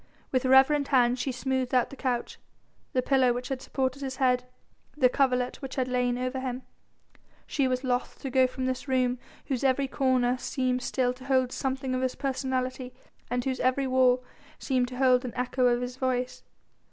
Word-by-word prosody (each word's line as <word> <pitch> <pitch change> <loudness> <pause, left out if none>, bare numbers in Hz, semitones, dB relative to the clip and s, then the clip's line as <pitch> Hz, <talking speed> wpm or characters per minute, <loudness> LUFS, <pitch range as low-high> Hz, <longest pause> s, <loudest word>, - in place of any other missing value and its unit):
With 255 -1 +1
reverent 270 +2 +5
hands 250 -2 +3
she 265 - -1
smoothed 260 0 -1
out 250 - +2
the - - -8
couch, 250 -3 -3 0.5
the 255 - 0
pillow 260 -2 +3
which 245 +1 -5
had 265 -1 -3
supported 265 +1 -2
his 265 -1 -4
head, 250 -2 +2 0.5
the 255 -4 +5
coverlet 250 -2 +1
which 270 -2 -6
had 260 -2 0
lain 250 -1 0
over 255 +1 -2
him. 255 0 -4 0.8
She 275 -3 0
was 255 +1 -1
loth 250 -1 -1
to 270 - -3
go 260 0 +4
from 255 0 -4
this 255 +2 -3
room 255 -1 +1 0.3
whose 265 -3 -2
every 270 +1 +2
corner 255 -2 +1
seemed 255 -2 -1
still 250 0 0
to 255 +1 -14
hold 260 -2 +2
something 265 -1 -2
of 255 - -1
his 260 -1 -1
personality 255 -1 -3 0.3
and 245 0 -1
whose 260 -1 -1
every 260 +2 +1
wall 255 -1 +3 0.3
seemed 255 -2 0
to 250 0 -8
hold 255 -1 +4
an 250 - -5
echo 250 0 +1
of 240 0 +2
his 245 +1 -6
voice. 255 -1 -1
255 Hz, 190 wpm, -28 LUFS, 250-265 Hz, 0.8 s, reverent